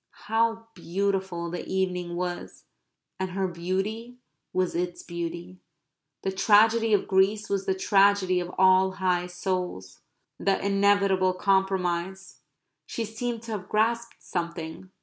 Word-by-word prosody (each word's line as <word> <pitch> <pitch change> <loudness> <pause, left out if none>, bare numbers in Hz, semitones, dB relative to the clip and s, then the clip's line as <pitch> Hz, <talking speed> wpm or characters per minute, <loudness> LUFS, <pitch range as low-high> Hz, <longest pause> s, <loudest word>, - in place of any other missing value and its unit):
How 225 0 +1
beautiful 190 -1 -2
the 175 - -4
evening 180 -2 -2
was! 175 0 -5 0.5
and 190 0 -2
her 190 0 0
beauty 195 +8 -3 0.3
was 185 -1 0
its 175 +1 -3
beauty. 170 +1 -6 0.6
The 190 - 0
tragedy 220 +3 +4
of 205 - +2
Greece 200 +3 +2
was 195 -1 -1
the 190 - +2
tragedy 195 -1 +3
of 175 0 -4
all 190 0 +5
high 180 -2 0
souls. 180 - -4 0.4
The 195 -1 +1
inevitable 200 -2 +3
compromise. 190 -1 0 0.5
She 230 - -3
seemed 230 +1 -4
to 230 - -7
have 200 -3 -5
grasped 230 +2 +1
something. 170 +1 -5
190 Hz, 125 wpm, -27 LUFS, 180-205 Hz, 0.6 s, all